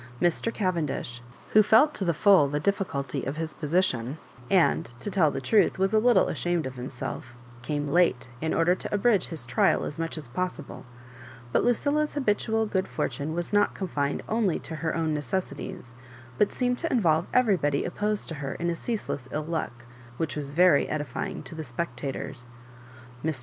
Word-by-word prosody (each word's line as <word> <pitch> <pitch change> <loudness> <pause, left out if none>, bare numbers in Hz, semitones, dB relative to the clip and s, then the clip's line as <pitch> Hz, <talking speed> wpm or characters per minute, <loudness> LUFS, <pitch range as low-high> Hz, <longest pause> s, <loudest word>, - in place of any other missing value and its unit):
Mr. 175 +6 +1
Cavendish, 165 - -2 0.3
who 215 - +7
felt 225 +8 +5
to - - -2
the 175 - +2
full 190 -4 +6
the 145 +1 -1
difficulty 160 -7 -1
of 140 +3 -3
his 160 -1 -3
position, 150 -5 0 0.3
and, 180 -10 +3
to 205 - -5
tell 180 -6 +4
the 135 - -3
truth, 195 - +3
was 190 +2 +1
a 215 - +5
little 230 -4 +4
ashamed 165 +4 -1
of 130 - -4
himself 125 0 -6 0.3
came 145 +2 -2
late, 150 -5 +2
in 160 - -1
order 165 +2 +3
to - - -6
abridge 205 -2 +2
his 155 -7 -5
trial 120 - +2
as 150 - -6
much 165 0 -3
as 150 -5 -7
possible; 180 0 -5 0.6
but - - +2
Lucilla's 290 +6 +1
habitual 220 -4 +1
good 190 -3 -1
for - - -1
tune 155 +2 -4
was 175 0 -3
Hot 205 0 +3
confined 145 -7 -2
only 215 -6 +1
to 160 - -7
her 160 0 -2
own 160 -2 0
necessi 150 +6 -2
ties, 125 -11 -8 0.5
but 210 - +3
seemed 250 -1 0
to 330 - -2
involve 170 -8 +2
everybody 185 - +2
opposed 210 +3 -2
to - - -4
her 135 -1 -3
in 170 +1 -1
a - - -2
ceaseless 165 - -4
ill 150 0 -2
luck, 155 -7 -4 0.3
which 160 -2 -2
was 145 -2 -4
very 175 -1 +4
edify 145 -4 -3
ing - - -7
to - - -9
the 160 0 -5
spectators. 130 -1 -5 0.8
Mr. 155 -4 -1
165 Hz, 185 wpm, -27 LUFS, 145-200 Hz, 0.8 s, who